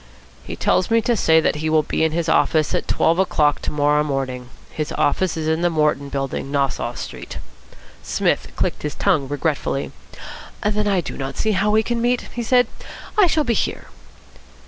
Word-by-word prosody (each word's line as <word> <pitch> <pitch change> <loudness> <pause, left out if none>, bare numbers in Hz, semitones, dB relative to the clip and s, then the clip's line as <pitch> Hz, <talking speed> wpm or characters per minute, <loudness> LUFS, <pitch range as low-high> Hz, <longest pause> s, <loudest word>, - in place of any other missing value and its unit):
"He - - -6
tells 185 - +1
me 230 0 +4
to 240 - +2
say 160 -6 +4
that 160 - +1
he 155 +1 -2
will 155 -1 +3
be 155 - -1
in 160 - +2
his 170 0 -1
office 155 -1 +2
at - - -1
twelve 165 +2 +2
o'clock 150 -6 +2
to - - -3
morrow 150 0 +2
morning. 130 -3 -3 0.2
His 155 -1 -4
office 170 +3 +1
is 155 -1 -2
in 160 +1 +1
the 175 - +3
Morton 150 -3 0
Building, 135 -1 -3
Nassau 135 -4 -1
Street." - - -7 0.6
Psmith - - 0
clicked - - -1
his 150 - -4
tongue 140 -3 +1
regretfully. 145 -1 -2 0.7
"Then 210 0 0
I 195 -3 +2
do 155 - -7
not 135 0 -5
see 220 - +1
how 205 +1 +1
we 215 +1 +3
can 235 +1 -2
meet," 245 +1 +1
he 240 - -3
said. 245 +1 +4 0.5
"I 410 -4 +5
shall 310 -2 +2
be 240 - +1
here." - - -2
160 Hz, 190 wpm, -21 LUFS, 145-210 Hz, 0.7 s, I